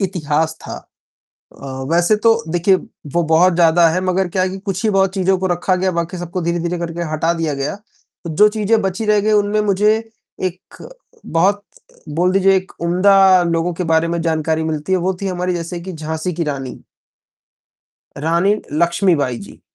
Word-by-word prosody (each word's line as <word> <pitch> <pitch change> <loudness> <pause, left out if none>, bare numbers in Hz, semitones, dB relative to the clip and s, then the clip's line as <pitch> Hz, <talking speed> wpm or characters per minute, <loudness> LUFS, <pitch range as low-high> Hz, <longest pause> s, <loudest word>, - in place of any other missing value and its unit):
इतिहास 160 -4 -1
था। - - -7 0.9
अ, - - -7 0.2
वैसे 175 +5 +3
तो 225 +2 +4 0.2
देखिए 175 +3 +3 0.4
वो 175 - +2
बहुत 180 +3 +5
ज़्यादा 170 0 +4
है 175 +3 0
मगर 185 0 0
क्या 185 +1 -1
है 185 - +1
कि 190 +1 -6
कुछ 190 -1 -4
ही 220 - +3
बहुत 195 -1 +1
चीज़ों 190 0 +1
को 190 - -1
रखा 180 +1 0
गया, 185 +1 0
बाकी 170 +1 -3
सबको 175 +1 -4
धीरे-धीरे 170 +1 -2
करके 170 0 -4
हटा 160 +2 +1
दिया 165 -3 -2
गया, 140 +6 -3
तो 205 -4 -14
जो 210 +4 +6
चीज़ें 215 +1 +1
बची 195 +3 -2
रह 210 -1 +3
गईं, 215 +2 +1
उनमें 205 0 +2
मुझे 210 +1 +2 0.5
एक 185 0 -5 0.5
बहुत 195 +5 +1 0.5
बोल 180 +3 +2
दीजिए 195 0 +4
एक 190 0 -4
उम्दा 185 +2 +4
लोगों 170 0 0
के 180 - -3
बारे 160 +1 +2
में 170 0 -2
जानकारी 160 -1 0
मिलती 155 +2 -3
है, 185 - +3
वो 185 +2 -1
थीं 195 - -1
हमारी 180 0 -2
जैसे 170 +1 -5
कि 185 +2 -7
झाँसी 160 +2 -4
की 170 +1 -2
रानी। 135 -3 -5 1.3
रानी 170 +7 +1 0.2
लक्ष्मीबाई 170 -5 +1
जी। 100 - -13
180 Hz, 180 wpm, -18 LUFS, 165-190 Hz, 1.3 s, जो